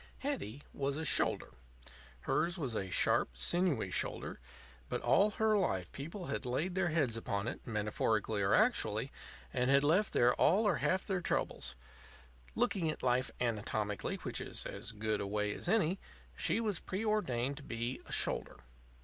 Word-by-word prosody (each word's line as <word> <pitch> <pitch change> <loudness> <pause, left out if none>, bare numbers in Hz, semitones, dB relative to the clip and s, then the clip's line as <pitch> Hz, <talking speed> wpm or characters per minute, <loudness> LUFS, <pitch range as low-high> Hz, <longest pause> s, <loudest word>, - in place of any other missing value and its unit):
Hetty 145 - -4
was 140 0 -1
a 160 - -3
Shoulder. - - +2 0.7
Hers 175 +2 0
was 135 -8 -3
a 95 -3 -2
sharp, 60 -7 +2
sinewy 155 - +2
shoulder; - - 0 0.5
but - - -1
all 205 +2 +4
her 215 +1 +2
life 95 - 0
people 170 +7 -6
had - - -3
laid 145 +9 -1
their 190 -1 +1
heads 150 -8 +1
upon 100 -2 -2
it, 120 - -6
metaphorically 105 0 0
or 95 0 +2
actually, - - +2 0.4
and 125 +1 +1
had 140 +1 +5
left 180 +8 +3
there 120 0 +4
all 205 +6 +4
or 195 - +3
half 185 0 +1
their 190 -2 -1
troubles. 65 - -1 0.8
Looking 200 -9 +1
at 155 - -4
Life 125 +1 +2
anatomically, 105 -3 -1
which - - -2
is - - -3
as - - -5
good 110 -1 -1
a 100 - -2
way 105 +1 0
as - - -6
any, 195 -4 +2 0.4
she - - +1
was 210 -6 -1
preordained 185 - -1
to 150 - -9
be 120 +1 -3
a - - -10
Shoulder. - - +1
140 Hz, 165 wpm, -34 LUFS, -, 0.8 s, had